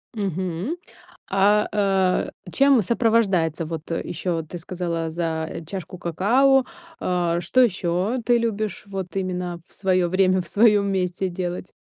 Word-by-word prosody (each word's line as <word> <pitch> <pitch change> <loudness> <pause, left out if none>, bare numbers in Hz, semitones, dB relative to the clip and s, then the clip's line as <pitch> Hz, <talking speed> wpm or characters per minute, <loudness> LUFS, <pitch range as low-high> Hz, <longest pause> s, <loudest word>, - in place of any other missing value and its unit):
Мгм. 190 - -2 0.6
А, 205 +2 +3
э, 195 -3 +2 0.2
чем 275 - +5
сопровождается 195 -7 +1
вот, 160 0 -6
э, 165 - -1
ещё 175 +1 -2
вот 160 -1 -5
ты 175 - -6
сказала 170 -1 -3
за 165 0 -3
чашку 185 0 -6
какао, 245 - +3 0.4
э, 175 -2 0
что 175 +9 +2
ещё 190 +1 0
ты 240 0 +4
любишь 220 -2 -2
вот 195 -2 -6
именно 180 -2 -3
в - - -23
своё 185 -2 +1
время, 185 0 +2
в 170 - -11
своём 210 -2 +4
месте 185 0 -1
делать? 180 0 -5
185 Hz, 140 wpm, -23 LUFS, 175-205 Hz, 0.6 s, чем